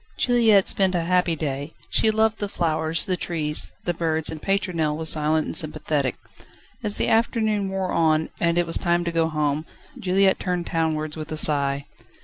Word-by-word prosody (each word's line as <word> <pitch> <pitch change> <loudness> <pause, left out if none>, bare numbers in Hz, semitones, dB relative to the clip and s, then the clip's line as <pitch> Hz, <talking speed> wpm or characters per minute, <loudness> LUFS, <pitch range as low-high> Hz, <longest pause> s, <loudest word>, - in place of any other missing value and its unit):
Juliette 225 -5 +4
spent 190 -2 +3
a 170 - 0
happy 180 -1 +1
day; 145 0 -4 0.2
she 220 - +3
loved 220 0 +1
the 205 - -3
flowers, 160 -2 -1
the 185 - 0
trees, 155 -4 -1
the 175 - -1
birds, 160 -2 0
and 155 -1 -7
Pétronelle 180 -6 -1
was 160 0 -2
silent 155 0 +1
and - - -5
sympathetic. 150 -4 -1 0.7
As 205 -1 +1
the - - +1
afternoon 220 -3 +1
wore 190 -1 -2
on, 160 -1 +2
and 170 0 +1
it 175 - +2
was 165 - 0
time 175 0 +1
to 170 - -2
go 165 -1 +1
home, 150 -1 -1 0.4
Juliette 190 +1 +2
turned 180 -2 -2
townwards 155 -2 -2
with 155 0 -7
a 155 - -3
sigh. 140 -2 +2
165 Hz, 180 wpm, -23 LUFS, 155-190 Hz, 0.7 s, Juliette